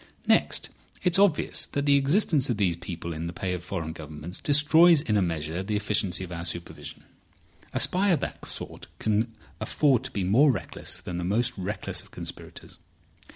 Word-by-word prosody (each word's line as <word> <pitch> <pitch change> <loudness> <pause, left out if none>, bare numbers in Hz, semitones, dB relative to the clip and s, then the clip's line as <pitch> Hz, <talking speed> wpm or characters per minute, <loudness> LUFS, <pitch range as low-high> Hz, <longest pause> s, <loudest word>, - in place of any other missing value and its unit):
Next, - - +2 0.3
it's 180 0 +3
obvious 195 -7 +3
that 140 0 -2
the 140 -1 +5
existence 140 0 +2
of 120 - 0
these 95 -5 +2
people 85 -1 -6
in 80 +2 -4
the 85 - -5
pay 90 0 -2
of 90 -1 -4
foreign 80 -4 -4
governments 80 +2 -8
destroys 155 +2 +6
in 110 -8 0
a 105 - +4
measure 80 -1 -2
the 105 +2 -2
efficiency 100 -3 0
of 90 - -8
our 85 -1 -5
supervision. 85 0 -6 0.7
A - - -1
spy 195 +3 +4
of 170 -6 +3
that - - -5
sort - - -7
can 110 +2 0 0.3
afford 140 -6 +2
to - - -4
be 100 - -2
more 125 +11 +5
reckless - - -4
than 90 - -6
the 90 - -3
most 115 +7 0
reckless 100 +2 -3
of - - -18
conspirators. - - -9
105 Hz, 185 wpm, -27 LUFS, 85-140 Hz, 0.7 s, destroys